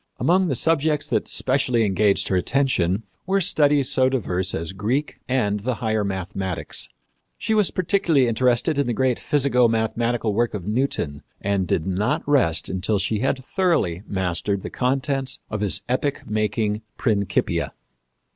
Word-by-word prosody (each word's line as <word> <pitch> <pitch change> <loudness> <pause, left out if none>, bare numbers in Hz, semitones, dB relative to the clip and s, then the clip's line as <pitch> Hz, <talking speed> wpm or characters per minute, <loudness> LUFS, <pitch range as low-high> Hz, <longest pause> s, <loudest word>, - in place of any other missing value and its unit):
Among 180 +8 +2
the 140 - 0
subjects 155 +1 +1
that - - 0
specially 125 -3 +2
engaged 100 0 +2
her 95 - +1
attention 100 -3 +1 0.2
were 195 +1 +2
studies 145 -5 +3
so 130 0 +3
diverse 95 -7 -1
as 80 +1 -4
Greek 120 +9 -2
and 105 -5 +1
the 125 +4 -2
higher 110 -1 -1
mathematics. 95 -7 -2 0.5
She 220 - -1
was 210 -3 +3
particularly 165 -7 +2
interested 125 +5 +1
in 140 - +1
the 120 - -1
great 130 -1 +1
physico 135 -4 +3
mathematical 115 0 0
work 120 +1 0
of 95 -4 -6
Newton, 105 - -1 0.2
and 100 -2 -1
did 80 - 0
not 105 - -1
rest 120 - +2
until 95 +3 0
she 105 +3 -1
had 130 +2 -1
thoroughly 165 - 0
mastered 95 +1 -1
the - - -6
contents 135 +1 -1
of 110 -1 -3
his 105 -3 +1
epoch 135 +3 -1
making 105 0 -1 0.2
Principia. 100 -5 0
115 Hz, 150 wpm, -23 LUFS, 100-135 Hz, 0.5 s, studies